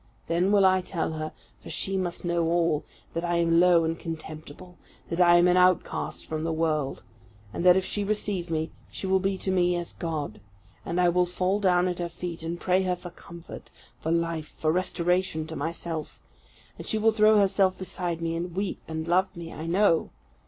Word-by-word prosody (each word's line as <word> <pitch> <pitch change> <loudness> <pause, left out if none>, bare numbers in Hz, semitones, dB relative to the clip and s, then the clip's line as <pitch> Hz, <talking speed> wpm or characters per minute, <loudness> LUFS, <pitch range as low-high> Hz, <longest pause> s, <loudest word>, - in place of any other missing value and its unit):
Then 175 +4 +1
will 200 -2 +5
I 185 0 +4
tell 175 -3 -2
her, 155 0 -4 0.3
for - - -10
she 195 - -1
must 180 -2 -2
know 170 0 +1
all, 165 -2 +1 0.3
that 165 - -2
I 175 0 0
am 170 0 +3
low 175 -1 +5
and 165 0 -2
contemptible; 160 +1 -8 0.3
that 170 +2 +1
I 175 0 +7
am 175 +1 +5
an 180 0 +4
outcast 180 -1 +1
from 155 0 -4
the 165 - -1
world, 155 -3 -1 0.5
and - - -3
that 180 0 +7
if 190 - 0
she 205 - -1
receive 200 -4 -1
me, 160 0 -1 0.2
she - - -6
will 190 0 +3
be 195 0 -1
to 190 - -2
me 180 -1 +2
as 175 -1 -4
God. 150 - -4 0.4
And 170 +2 -2
I 175 -1 +5
will 180 +1 +2
fall 185 +3 0
down 180 -2 +3
at 180 -1 -3
her 175 -1 -2
feet 170 0 -6
and 165 +1 -4
pray 185 +1 +2
her 185 -1 0
for 175 0 -10
comfort, 170 -1 -11 0.3
for 160 - -2
life, 165 -2 -1
for 155 - -1
restoration 180 -1 0
to 160 0 -7
myself; 160 0 -4 0.6
and - - -8
she 220 - +1
will 220 +1 +4
throw 215 0 +5
herself 195 -2 +3
beside 175 -2 -3
me, 165 0 -1
and 170 +1 -4
weep 195 0 -2
and 160 0 -4
love 185 +1 +1
me, 165 -1 -7
I 160 - -6
know. 175 -1 +3
175 Hz, 205 wpm, -27 LUFS, 165-185 Hz, 0.6 s, I